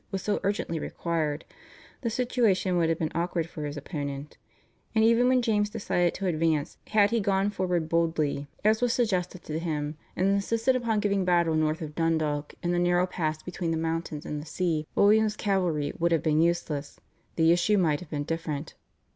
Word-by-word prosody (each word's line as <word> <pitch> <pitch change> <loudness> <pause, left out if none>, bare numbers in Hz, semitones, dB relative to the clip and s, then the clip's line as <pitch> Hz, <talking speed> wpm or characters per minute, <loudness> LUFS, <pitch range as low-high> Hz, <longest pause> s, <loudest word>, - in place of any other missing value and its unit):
was 190 -1 -4
so 210 - 0
urgently 195 -5 -1
required, 155 -2 -2 0.6
the 235 - -1
situation 225 -6 +1
would 170 -2 +2
have 165 - +1
been 155 -2 -2
awkward 170 -1 -1
for 155 -3 -6
his 145 0 -5
opponent; 145 -1 -5 0.6
and 220 - +4
even 230 +2 +5
when 255 -1 +3
James 210 -3 +1
decided 175 -5 0
to 195 - -4
advance 160 -4 0
had 210 -1 +3
he 230 - +2
gone 195 0 +1
forward 180 -5 -1
boldly, 160 -4 0 0.2
as 220 +2 +4
was 245 -1 +2
suggested 185 -7 -1
to 155 +1 -3
him, 150 -2 -3 0.2
and 185 - +1
insisted 225 +6 +1
upon 230 -4 0
giving 200 -2 +1
battle 175 -2 +2
north 155 +1 0
of 150 -1 -7
Dundalk 155 -2 -1
in 175 - 0
the 175 - +1
narrow 175 0 +3
pass 155 -4 -3
between 180 -1 -4
the 165 - 0
mountains 160 -2 -3
and 150 -1 -4
the - - -10
sea 155 -1 -1
where - - +5
William's 215 0 +4
cavalry 175 -8 0
would 170 0 +2
have 165 - +2
been 155 -1 +3
useless, 165 -4 -1 0.4
the 165 0 +4
issue 175 +5 +3
might 160 -6 +2
have 180 -4 -11
been 145 -2 -2
different. 160 -1 -4
170 Hz, 190 wpm, -27 LUFS, 155-200 Hz, 0.6 s, even